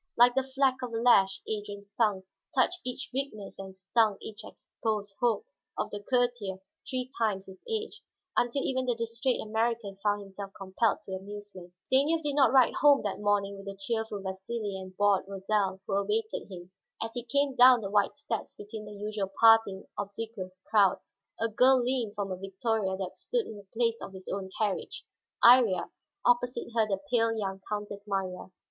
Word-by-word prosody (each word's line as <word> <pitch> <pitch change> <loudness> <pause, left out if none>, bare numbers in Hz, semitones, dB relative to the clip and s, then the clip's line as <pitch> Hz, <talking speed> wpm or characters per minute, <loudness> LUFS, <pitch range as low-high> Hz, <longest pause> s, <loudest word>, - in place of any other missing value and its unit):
Like 245 +1 +7
the 265 - +2
fleck 265 0 +1
of 250 -2 -4
a - - -1
lash 195 -5 +4
Adrian's 205 -2 -5
tongue 210 -4 +1 0.3
touched 310 +8 +2
each 250 +1 -4
weakness 255 -9 -4
and 190 -1 -8
stung 205 +2 +2
each 215 0 -8
exposed 215 -2 -4
hope 240 - +1 0.3
of - - -2
the 205 - -4
courtier 245 -5 0 0.3
three 255 -1 -2
times 205 -4 0
his 190 -1 -13
age, 445 0 -3 0.3
until 245 +3 +1
even 260 -1 -1
the 245 - +2
distrait 230 +2 -1
American 220 -2 -1
found 205 -1 +1
himself 195 0 -8
compelled 195 +4 0
to - - -10
amusement. 190 -2 -8 0.2
Stanief 310 +5 +3
did 290 -1 0
not 280 -1 +5
ride 260 -2 +5
home 285 -1 +5
that 205 -2 -3
morning 205 -1 +1
with 195 0 -11
the 195 - -5
cheerful 220 0 -3
Vasili 195 +2 -4
and 185 -1 -8
bored 205 -1 +3
Rosal, 195 -1 -1
who 200 - -3
awaited 430 - -1
him. 180 -1 -10 0.3
As 225 - -3
he 245 - -3
came 275 +3 +1
down 250 -1 +8
the 195 -2 -5
wide 205 +6 +2
steps 235 -7 -4
between 210 +1 -8
the 210 - -9
usual 205 -1 -3
parting, 225 -4 +5
obsequious 200 -2 -6
crowds, 200 -4 +2 0.2
a 230 - +2
girl 255 +4 +5
leaned 245 -4 0
from 200 -2 -3
a 185 - -3
victoria 195 +1 -1
that 190 -1 -5
stood 480 -2 -1
in 220 - -8
the 200 -1 -13
place 230 0 0
of - - -7
his 190 -1 -10
own 195 -1 -4
carriage, 210 -3 -2 0.4
Iría, 235 -6 +6 0.3
opposite 245 0 +2
her 225 -2 +3
the 195 -2 -1
pale 230 -2 +3
young 195 -2 -3
Countess 205 -1 -5
Marya. 190 -3 -3
215 Hz, 180 wpm, -29 LUFS, 195-245 Hz, 0.4 s, down